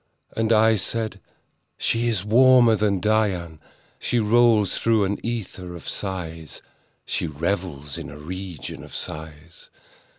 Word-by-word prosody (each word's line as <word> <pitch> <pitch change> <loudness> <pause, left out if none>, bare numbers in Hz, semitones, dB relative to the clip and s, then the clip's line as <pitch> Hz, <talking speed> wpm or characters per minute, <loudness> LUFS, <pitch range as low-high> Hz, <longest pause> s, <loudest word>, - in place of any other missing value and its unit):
And 115 0 0
I 110 0 +5
said—"She 115 +2 -3
is 105 -5 0
warmer 120 +1 +6
than 105 -2 +1
Dian: 95 -6 0 0.4
She 120 - 0
rolls 115 -2 +3
through 115 -2 +3
an 100 +1 -2
ether 95 -6 -5
of 85 - -10
sighs— 80 -6 -5 0.4
She - - -2
revels 80 -2 -3
in - - -7
a 75 - -10
region 90 +1 -7
of - - -10
sighs. 80 +1 -8
100 Hz, 125 wpm, -23 LUFS, 85-110 Hz, 0.4 s, warmer